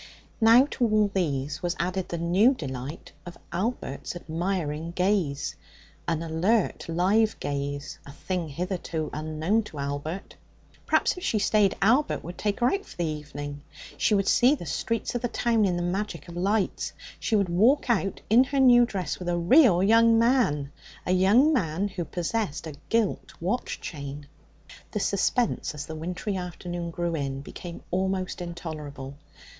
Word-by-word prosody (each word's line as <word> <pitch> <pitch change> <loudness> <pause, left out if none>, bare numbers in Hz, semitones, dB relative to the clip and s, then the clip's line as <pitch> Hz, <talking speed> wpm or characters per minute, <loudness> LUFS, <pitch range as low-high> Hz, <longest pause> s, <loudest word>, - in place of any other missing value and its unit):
Now 230 +4 +7
to - - -1
all 215 -2 +2
these 150 -5 -1
was 175 -1 -1
added 180 +1 -2
the 170 - -3
new 185 +10 +4
delight 135 - -6
of 175 -1 -10
Albert's 180 - -3
admiring 170 -2 -3
gaze 180 -7 0 0.5
an 165 -1 0
alert, 170 +5 0
live 200 +6 +2
gaze, 140 0 -4
a 140 - -11
thing 175 +4 -3
hitherto 170 0 -3
unknown 155 +8 0
to 155 - -10
Albert. 145 +6 -4 0.5
Perhaps, - - +2
if 360 - -8
she 220 - +1
stayed, 205 -1 +2
Albert 250 +8 +3
would 175 +3 -8
take 205 +2 -1
her 245 - +4
out 395 0 -1
for - - -14
the 175 - 0
evening. 145 -2 -5 0.3
She 215 - +2
would 195 -1 +1
see 255 +4 +5
the 210 - -8
streets 225 +9 -2
of 245 - -2
the 245 - 0
town 230 -2 +1
in 180 -2 +1
the 175 - -1
magic 180 -2 -3
of 170 - -9
lights. 195 +3 0 0.3
She 225 - 0
would 200 -4 +2
walk 225 +13 +3
out 195 -5 0
in 240 +5 +6
her 275 +1 -1
new 245 -2 +7
dress 190 -5 -3
with 180 -1 -4
a 175 - +1
real 185 - +5
young 230 +2 +5
man 225 - +2 0.3
a - - 0
young 205 +12 +5
man 190 - 0
who 180 -3 -4
possessed 175 -1 -2
a 160 - -6 0.2
gilt 225 -3 -1
watch 200 +9 -2
chain. 145 -2 -7 0.7
The - - 0
suspense, 240 -9 0
as 145 -1 -5
the 160 - -7
wintry 180 +5 -3
afternoon 175 -1 -5
drew 170 0 -2
in, 135 -2 -3
became 170 +4 -9
almost 185 0 -1
intolerable. 155 -6 -6
180 Hz, 165 wpm, -26 LUFS, 160-215 Hz, 0.7 s, Now